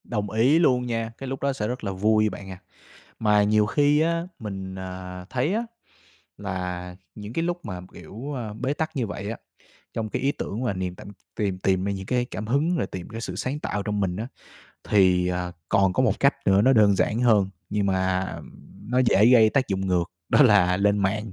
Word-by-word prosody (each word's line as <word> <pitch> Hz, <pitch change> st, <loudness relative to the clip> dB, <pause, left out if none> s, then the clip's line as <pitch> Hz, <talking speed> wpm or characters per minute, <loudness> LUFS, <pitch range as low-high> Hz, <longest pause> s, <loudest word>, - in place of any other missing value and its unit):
Đồng 105 Hz, -3 st, -3 dB
ý 125 Hz, +9 st, +4 dB
luôn 125 Hz, -7 st, +3 dB
nha, 115 Hz, -1 st, -2 dB
cái 135 Hz, -, -7 dB
lúc 135 Hz, 0 st, -5 dB
đó 140 Hz, 0 st, +1 dB
sẽ 105 Hz, -5 st, -3 dB
rất 125 Hz, +1 st, -4 dB
là 100 Hz, -, -2 dB
vui 110 Hz, +3 st, +2 dB
bạn 95 Hz, 0 st, -9 dB
à. 90 Hz, -, -9 dB, 0.6 s
Mà 105 Hz, -2 st, +3 dB
nhiều 105 Hz, +1 st, +3 dB
khi 145 Hz, +5 st, +3 dB
á 170 Hz, +1 st, 0 dB
mình, 95 Hz, -3 st, -6 dB
à, 90 Hz, -1 st, -7 dB
thấy 130 Hz, +9 st, 0 dB
á 225 Hz, -, 0 dB, 0.8 s
là 90 Hz, -2 st, -5 dB, 0.2 s
những 105 Hz, +1 st, -8 dB
cái 165 Hz, -, 0 dB
lúc 175 Hz, +1 st, -2 dB
mà, 90 Hz, -3 st, -5 dB
kiểu, 110 Hz, -, -8 dB
a, 115 Hz, -6 st, -5 dB
bế 130 Hz, +6 st, -2 dB
tắc 160 Hz, +1 st, -3 dB
như 125 Hz, -5 st, -1 dB
vậy 100 Hz, 0 st, -5 dB
á, 115 Hz, -, -4 dB, 0.6 s
trong 110 Hz, -1 st, -3 dB
cái -, -, -3 dB
ý 135 Hz, +2 st, +2 dB
tưởng 115 Hz, -3 st, -5 dB
và 120 Hz, -, 0 dB
niềm 90 Hz, -1 st, -4 dB
t -, -, -13 dB, 0.3 s
tìm 100 Hz, -3 st, -1 dB
tìm 95 Hz, 0 st, +1 dB
ra 100 Hz, -, 0 dB
những 95 Hz, -1 st, -5 dB
cái 125 Hz, +3 st, 0 dB
cảm 110 Hz, -3 st, -6 dB
hứng 150 Hz, +8 st, +1 dB
rồi -, -, -1 dB
tìm 90 Hz, -2 st, -8 dB
cái 115 Hz, 0 st, -6 dB
sự 90 Hz, -5 st, -5 dB
sáng 130 Hz, +9 st, -3 dB
tạo 105 Hz, -8 st, -3 dB
trong 105 Hz, 0 st, -2 dB
mình 95 Hz, -3 st, 0 dB
á, 110 Hz, +3 st, -4 dB, 0.6 s
thì, 90 Hz, -3 st, +3 dB
à, 90 Hz, 0 st, -2 dB, 0.2 s
còn 95 Hz, -1 st, +3 dB
có -, -, +1 dB
một -, -, +1 dB
cách -, -, +4 dB
nữa 95 Hz, +1 st, +5 dB
nó 130 Hz, +4 st, +5 dB
đơn 105 Hz, -5 st, +5 dB
giản 110 Hz, +4 st, +1 dB
hơn, 105 Hz, -6 st, +3 dB, 0.2 s
nhưng 105 Hz, -1 st, 0 dB
mà, 95 Hz, -1 st, +1 dB, 0.2 s
ừm, -, -, -11 dB, 0.4 s
nó 125 Hz, -, +2 dB
dễ 115 Hz, -4 st, +4 dB
gây 115 Hz, -3 st, +6 dB
tác 130 Hz, +1 st, +1 dB
dụng 95 Hz, 0 st, -1 dB
ngược, 90 Hz, -2 st, 0 dB, 0.2 s
đó -, -, +5 dB
là 100 Hz, -7 st, +5 dB
lên 100 Hz, +1 st, +2 dB
mạng. 100 Hz, +2 st, -1 dB
105 Hz, 225 wpm, -25 LUFS, 95-125 Hz, 0.8 s, gây